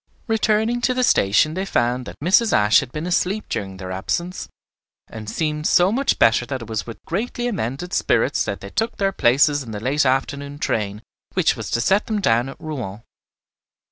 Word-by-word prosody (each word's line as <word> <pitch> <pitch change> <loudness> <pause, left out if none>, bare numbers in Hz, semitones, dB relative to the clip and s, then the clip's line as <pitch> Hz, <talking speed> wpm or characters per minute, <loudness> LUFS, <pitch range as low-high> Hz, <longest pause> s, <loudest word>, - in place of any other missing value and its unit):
Returning 225 +1 +1
to 255 +1 +1
the 255 - +1
station 105 - +3
they 190 +3 -2
found 125 -7 0
that - - -8
Mrs. 195 +6 +4
Ashe 105 +1 +5
had 130 -3 -6
been 155 +3 -5
asleep 185 +4 0
during 95 -2 -4
their 95 -1 -7
absence, 170 - -3 0.6
and 110 -1 -8
seemed 150 +1 -1
so 180 +2 +4
much 270 +5 +1
better 115 +1 +4
that 130 -3 -4
it - - -11
was 110 -3 -4
with 115 - -7
greatly 240 +6 -2
amended 175 - -3
spirits - - +2
that - - -4
they - - -9
took 225 +1 -2
their 195 -1 +1
places 145 0 +3
in 125 - -9
the 105 -1 -5
late 135 +7 +1
afternoon 140 +2 -1
train 105 -6 -2 0.3
which - - +3
was - - -6
to 115 - 0
set 195 - +2
them 215 -2 -1
down 120 - +2
at 135 - -11
Rouen. 125 - -6
145 Hz, 195 wpm, -21 LUFS, 115-195 Hz, 0.6 s, Ashe